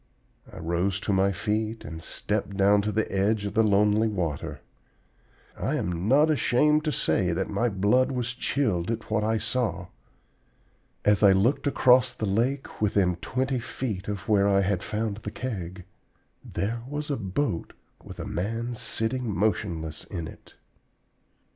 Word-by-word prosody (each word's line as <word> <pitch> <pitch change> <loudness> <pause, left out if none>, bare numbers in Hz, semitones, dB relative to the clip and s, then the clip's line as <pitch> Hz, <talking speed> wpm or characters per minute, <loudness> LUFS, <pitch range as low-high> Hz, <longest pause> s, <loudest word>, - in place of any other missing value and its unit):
I - - -11
rose 90 +4 -1
to 100 - 0
my 95 +1 +3
feet 110 +3 -2
and 80 +2 -7
stepped 100 +2 -3
down 100 +1 +5
to 105 +1 -1
the 110 +1 0
edge 100 +2 +1
of 100 - -3
the 110 - +4
lonely 105 +1 +3
water. 85 -9 -3 0.9
I - - -1
am 90 +2 -2
not 150 +6 +5
ashamed 150 +2 +3
to 155 - +1
say 90 - +1
that 95 +4 -2
my 115 +4 +1
blood 105 +7 +2
was 125 -1 -2
chilled 110 -9 0
at 115 -1 -4
what 110 -1 +1
I 110 +1 +1
saw. 110 -7 -2 1.2
As 105 -1 +4
I 100 -2 +7
looked 115 +10 +2
across 130 -2 +4
the 110 - -2
lake, 120 +8 -1
within 95 -4 +2
twenty 130 +6 -1
feet 110 -5 -4
of 100 -1 -4
where 100 -2 +4
I 100 -1 +4
had 95 -2 0
found 105 -1 -2
the 105 - -6
Keg, 95 -7 -5 0.6
there 115 +4 -3
was 150 +1 -4
a - - +1
boat 100 - -2 0.3
with - - -10
a - - -4
man 115 +7 -3
sitting 115 +1 -2
motionless 85 -5 -1
in 85 -5 -5
it! - - -14
105 Hz, 160 wpm, -26 LUFS, 95-120 Hz, 1.2 s, I